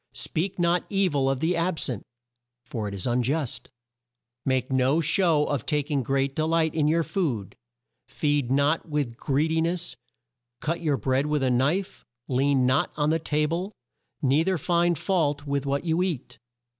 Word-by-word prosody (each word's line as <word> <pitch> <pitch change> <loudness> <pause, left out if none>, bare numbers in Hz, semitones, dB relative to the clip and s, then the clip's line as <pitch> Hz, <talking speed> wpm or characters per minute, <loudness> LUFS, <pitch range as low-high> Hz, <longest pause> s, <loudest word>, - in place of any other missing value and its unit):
"Speak 180 +4 -2
not 175 0 +2
e 195 -2 +2
vil 140 -5 +1
of 135 0 -1
the 170 +3 +1
ab 170 0 0
sent, 120 -9 -2 0.6
for 115 -4 -4
it 100 - -5
is 95 - -4
un 125 0 +2
just. 135 +1 -2 0.7
"Make 130 -1 0
no 130 +4 +3
show 165 -3 +2
of 140 -6 -2
ta 150 -1 0
king 145 -2 0
great 135 +2 0
delight 160 0 +1
in 155 -2 +2
your 165 +2 +2
food; 135 - -2 0.5
feed 145 -4 0
not 145 +4 +2
with 145 -6 -1
greed 145 +5 0
i - - +2
ness; 170 +2 -1 0.6
cut 170 +5 -2
your 150 -4 +1
bread 130 +5 0
with 150 -2 0
a 130 - +2
knife; 145 +10 0 0.2
lean 135 0 +2
not 130 +2 +2
on 150 0 +2
the 165 - +1
ta 150 -1 0
ble; 175 +6 -3 0.5
nei 140 +4 +3
ther 185 +1 +1
find 170 +2 +1
fault 150 -4 0
with 140 -1 -1
what 140 +4 -1
you 165 +1 +1
eat. 145 -9 -3
150 Hz, 180 wpm, -26 LUFS, 135-165 Hz, 0.7 s, no